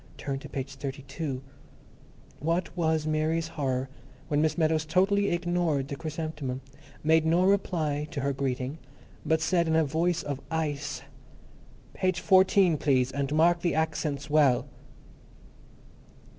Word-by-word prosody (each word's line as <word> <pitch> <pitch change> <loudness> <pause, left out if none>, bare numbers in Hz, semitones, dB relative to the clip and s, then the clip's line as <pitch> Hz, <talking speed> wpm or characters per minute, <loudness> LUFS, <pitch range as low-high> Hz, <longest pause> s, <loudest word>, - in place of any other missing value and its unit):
Turn 135 -1 -3
to - - -10
page 135 0 -5
thirty 135 0 -5
two," 135 -1 -5 1.0
what 170 +3 -1
was 160 -3 +1
Mary's 155 +1 0
horror 130 -4 -2 0.4
when 150 0 +2
Miss 155 +2 +1
Meadows 160 -1 +2
totally 195 +5 +2
ignored 175 -5 0
the 140 - -3
chrysanthemum, 155 -4 -4 0.4
made 160 +1 +4
no 165 +3 +3
reply 165 -7 +1
to 150 -4 -4
her 140 +1 0
greeting, 135 +2 -3 0.4
but 160 +1 +1
said 170 +1 +2
in 160 - +2
a 160 -1 +4
voice 170 +4 0
of 140 -2 -4
ice, 145 -4 -2 0.9
"Page 185 -2 0
fourteen, 190 -3 +4
please, 130 -3 +2
and 140 0 -2
mark 170 +2 +4
the 170 - 0
accents 150 -3 -1
well." 145 -4 +3
155 Hz, 135 wpm, -28 LUFS, 140-170 Hz, 1.0 s, made